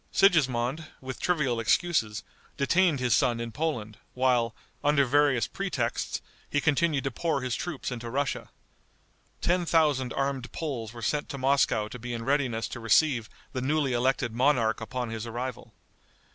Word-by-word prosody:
Sigismond, 150 - +3
with 130 -1 -7
trivial 145 -9 +1
excuses, 110 - +1 0.3
detained 165 +1 +3
his 125 -3 +2
son 120 +4 +2
in 115 0 -4
Poland, 110 -8 -3 0.2
while, 125 -3 +2 0.3
under 145 -1 +4
various 140 -3 +3
pretexts, - - -2 0.3
he 145 - +1
continued 150 -1 +2
to 135 - -1
pour 155 +2 -1
his 125 -2 -1
troops 170 -7 -4
into 120 -1 -5
Russia. 140 +2 -2 0.9
Ten 180 +1 +2
thousand 150 -7 +2
armed 135 -2 -2
Poles 125 -9 -4
were 115 -1 -9
sent 150 +6 -1
to 140 - -5
Moscow 135 -5 +2
to 125 - -9
be 120 +1 -4
in 115 0 -5
readiness 130 -5 +1
to 120 - -6
receive 115 +1 +3 0.2
the 130 - -2
newly 140 0 +1
elected 120 -1 +1
monarch 120 -3 +2
upon 120 +1 -4
his 115 0 -4
arrival. 120 +2 -5
130 Hz, 155 wpm, -28 LUFS, 120-145 Hz, 0.9 s, under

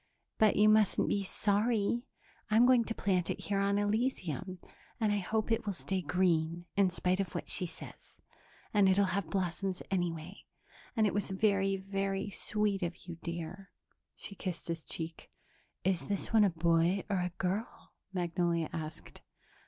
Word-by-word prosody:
"But 215 -1 +5
you 210 +1 +5
mustn't 215 -2 +4
be 200 - +1
sorry. 215 +5 +1 0.4
I'm 220 +3 +6
going 250 -2 +5
to 225 - -3
plant 185 -4 +1
it - - -2
here 200 -1 -1
on 200 0 +2
Elysium, 205 - -1 0.4
and 215 -2 +2
I 205 - +1
hope 215 +4 -1
it 225 -1 0
will 200 - 0
stay 190 +1 -2
green 170 -1 +1
in 195 -2 +4
spite 180 +1 0
of 195 -4 -2
what - - -3
she 180 - 0
says, - - -12 0.6
and 200 -2 +5
it'll 200 +1 +4
have 195 -4 -1
blossoms 185 +1 -2
anyway... 175 -1 -2 0.5
and 220 - +3
it 205 - +1
was 205 0 -1
very, 195 0 +2
very 195 +1 -2
sweet 210 -1 0
of 175 -1 -2
you, 170 -2 -7
dear." 170 +3 -6 0.5
She - - -7
kissed 185 -3 -5
his 165 -1 -3
cheek. 165 0 -7 0.5
"Is 185 -2 0
this 200 +2 -2
one 215 -2 +7
a - - +4
boy 170 +2 +2
or 200 -2 0
a 180 0 0
girl?" 195 +5 -3 0.2
Magnolia 170 -2 0
asked. 155 -1 -7
195 Hz, 165 wpm, -32 LUFS, 175-205 Hz, 0.6 s, one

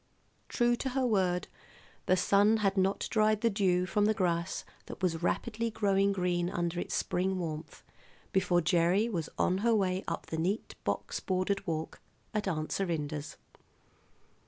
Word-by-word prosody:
True 240 0 +2
to 265 - -2
her 260 - +2
word, 185 -6 +1 0.6
the 185 - +4
sun 205 +4 +4
had 195 0 +2
not 195 0 +1
dried 215 -1 +3
the 230 - +3
dew 185 -3 +2
from 205 +2 +1
the 215 +1 +2
grass 170 -2 -1 0.2
that - - -9
was 165 -3 0
rapidly 230 +5 -1
growing 200 -2 +2
green 180 -2 0
under 175 -1 -2
its - - -3
spring 185 +1 0
warmth 160 -3 -5 0.5
before 180 -2 +3
Gerry 175 +5 +3
was 165 -7 -3
on 185 +1 +2
her 230 +2 +3
way 190 -2 0
up 165 - -3
the 160 - -4
neat 190 +7 -1
box - - -2
bordered 190 +1 -1
walk 160 -1 -3 0.3
at 210 -2 -1
Aunt 155 -4 -2
Serinda's. 155 -5 -3
185 Hz, 160 wpm, -31 LUFS, 175-205 Hz, 0.6 s, the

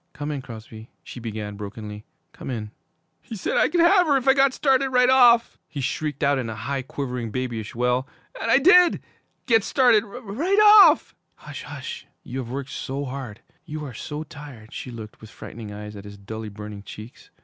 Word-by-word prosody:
'Come 150 +1 -5
in 145 -2 -4
Crosby 110 -2 -11
' - - -47
she - - -9
began 110 -3 -6
brokenly, 105 +1 -8 0.3
'come - - -9
in 110 -4 -5 0.2
' 160 0 -48
'He 225 - -8
said 195 - -3
I - - +4
could 340 +2 +2
have 355 +1 +5
her 285 -2 +4
if 265 0 -4
I 265 - +7
got 275 0 +4
started 270 -1 +2
right 250 0 +4
off!' 240 -3 +5
he 145 - -7
shrieked 145 +2 -3
out 140 -1 +3
in 120 -3 -3
a 110 - -5
high, 135 +4 -3
quivering, 125 -3 -5
babyish 115 -2 -4
wail, 125 +2 0 0.3
'and - - -2
I 230 - +6
did 355 +4 +6 0.5
get 225 -4 +3
started 245 -6 +4
right 245 - -2 0.2
off - - +5
' - - -47
'Hush - - -9
hush! - - -8 0.2
You 130 +1 -6
have 120 -3 -6
worked 135 +1 -5
so 140 +2 -4
hard! 130 -5 -7 0.2
You 150 0 -6
are 130 - -8
so 150 +7 -6
tired!' 145 -8 -12
She - - -6
looked, 110 -3 -10
with 110 - -12
frightened 110 0 -9
eyes, 105 0 -8
at 100 0 -10
his 100 0 -10
dully 110 +2 -7
burning 105 0 -9
cheeks. 110 +4 -12
135 Hz, 205 wpm, -24 LUFS, -, 0.5 s, I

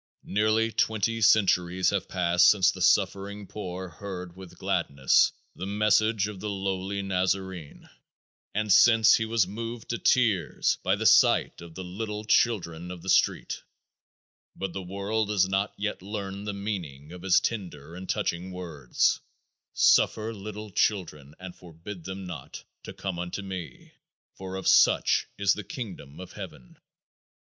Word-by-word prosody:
Nearly 110 +2 +1
twenty 110 +1 0
centuries 95 -4 +3
have 100 -2 -2
passed 90 -1 +4
since 95 -3 +4
the 95 - -9
suffering 100 +2 +1
poor 95 -2 -6
heard 90 0 -8
with 95 -2 -12
gladness 70 -1 +2 0.2
the 95 - -6
message 105 +1 +2
of 105 -3 -8
the 105 - -4
Lowly 95 0 -3
Nazarene 95 -3 -2 0.7
and 105 -2 +2
since 115 -1 +6
he 110 - -1
was 110 -3 +2
moved 115 +4 -7
to 115 - -2
tears 105 - +2
by - - +1
the - - -4
sight - - +4
of 85 -1 -12
the 95 - -6
little 105 +3 -5
children 90 -7 +1
of 90 -2 -8
the 95 - -5
street, - - +1 0.9
but 95 -3 -4
the 95 - -4
world 100 +4 -2
has 100 -3 +2
not 95 +2 0
yet 105 -2 -3
learned 100 0 -6
the - - -1
meaning 90 -8 -5
of 90 0 -10
his 95 0 +4
tender 85 -9 -5
and 90 +1 -9
touching 90 +2 -2
words, 80 -9 -1 0.5
"Suffer 110 +1 +3
little 105 0 -8
children, 80 -8 -1
and 90 -1 -9
forbid 85 +1 -11
them 95 0 -6
not, 80 -7 -8 0.2
to - - -9
come 95 -3 -5
unto 90 +3 -5
me; 90 -8 -8 0.4
for 95 0 -7
of 95 -1 -4
such - - +4
is 100 -1 +3
the 105 - -6
kingdom 90 - -8
of 95 - -9
heaven." - - -10
95 Hz, 150 wpm, -27 LUFS, 90-105 Hz, 0.9 s, since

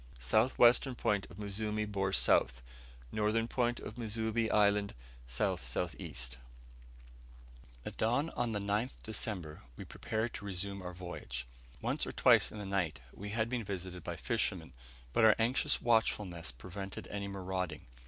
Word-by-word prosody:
south 85 - +2
western 125 +2 +6
point 105 -4 +1
of 90 - -12
Muzimu 105 +1 -2
bore 100 -2 -1
S., 95 - +3 0.8
northern 110 +2 +1
point 120 -1 0
of 110 - -8
Muzimu 110 0 0
island, 100 -1 +3 0.3
S.S.E. - - -2 1.7
At - - -5
dawn 130 +8 +2
on 120 -1 -1
the 105 - 0
9th 105 +5 -1
December 95 -8 -2 0.2
we - - -7
prepared 110 +1 -2
to 100 - -7
resume 100 0 -4
our 90 0 -6
voyage. 65 -9 -6 0.4
Once - - 0
or - - -3
twice - - +5
in - - -8
the 105 - -5
night 90 -8 0
we 100 +1 -7
had 110 +1 0
been 120 -1 -2
visited 95 -3 -5
by 85 0 -4
fishermen, 90 - -1 0.4
but - - +4
our 110 -1 +8
anxious 115 +3 +1
watchfulness 105 - +1
prevented 95 +9 -7
any 100 -1 -3
marauding. 95 -4 -3
100 Hz, 145 wpm, -34 LUFS, 90-110 Hz, 1.7 s, our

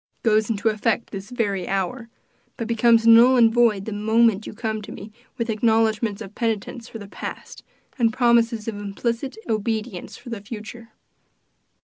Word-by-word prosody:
It - - -7
goes 215 0 +3
into 220 0 +1
effect 220 +2 -1
this 195 +1 -7
very 200 -7 -2
hour, 195 +5 -2 0.5
but 230 - -4
becomes 230 0 +3
null 235 +3 +7
and 225 -2 +5
void 225 -5 +3
the 220 - -5
moment 220 0 +2
you - - -7
come 220 -1 -3
to 205 - -10
me 210 +2 -9 0.3
with 230 -2 -2
acknowledgments 220 -1 +1
of 200 -1 -11
penitence 230 +1 -3
for - - -8
the 205 -2 -10
past, - - -8 0.4
and 230 -2 +3
promises 230 -2 +2
of 220 -2 -3
implicit 230 - -3
obedience 220 -2 -3
for 240 - -11
the 225 -3 -5
future." 225 +2 -9
225 Hz, 165 wpm, -23 LUFS, 210-235 Hz, 0.5 s, null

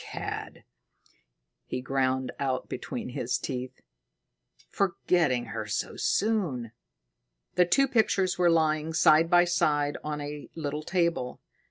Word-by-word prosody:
"Cad!" - - -6 1.0
he 125 - -4
ground 130 0 0
out 130 -2 -1
between - - -5
his - - -1
teeth. 130 0 -5 0.9
"Forgetting 170 - +1
her 110 -1 -4
so 105 - -3
soon!" 175 - 0 0.8
The 180 - +4
two 270 +11 +3
pictures 215 -7 +2
were 175 -1 +3
lying 160 -1 +2
side 160 0 +5
by 175 0 +6
side 150 -4 +1
on 150 0 -3
a 145 0 -7
little 150 -2 -3
table. 170 -7 -1
155 Hz, 120 wpm, -28 LUFS, 130-175 Hz, 1.0 s, by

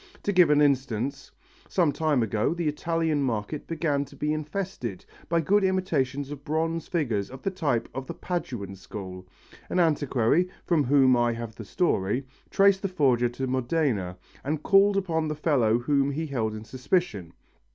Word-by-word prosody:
To 205 - +1
give 180 -3 +6
an 150 0 +5
instance: 135 -1 0 0.4
some 170 -5 +2
time 150 -5 +1
ago 110 +8 0
the 170 -2 -2
Italian 160 0 0
market 120 +2 -2
began 150 -4 0
to 140 +1 -15
be 150 +2 -1
infested 155 - -4 0.2
by 170 0 +2
good 200 +6 +3
imitations 145 -8 0
of 145 -1 -8
bronze 165 +2 -1
figures 120 - -1
of 130 +1 -11
the 195 - 0
type 145 -11 -1
of 135 0 -5
the 170 - -6
Paduan 120 - -4
school. 95 -1 -8 0.4
An 185 - 0
antiquary, 150 0 +2 0.2
from 165 -4 +2
whom 130 -1 +5
I 120 -1 +2
have 115 -1 -6
the 110 0 -9
story, 120 - 0 0.2
traced 195 -1 +4
the 195 - 0
forger 130 -9 +2
to 130 +3 -4
Modena 130 - -1 0.3
and 150 +2 -2
called 200 0 +5
upon 165 -5 0
the 155 - -2
fellow 130 -8 +2
whom 140 +3 +1
he 155 +3 -2
held 115 -7 -2
in 110 - -7
suspicion. 125 - -1
145 Hz, 170 wpm, -26 LUFS, 120-165 Hz, 0.4 s, give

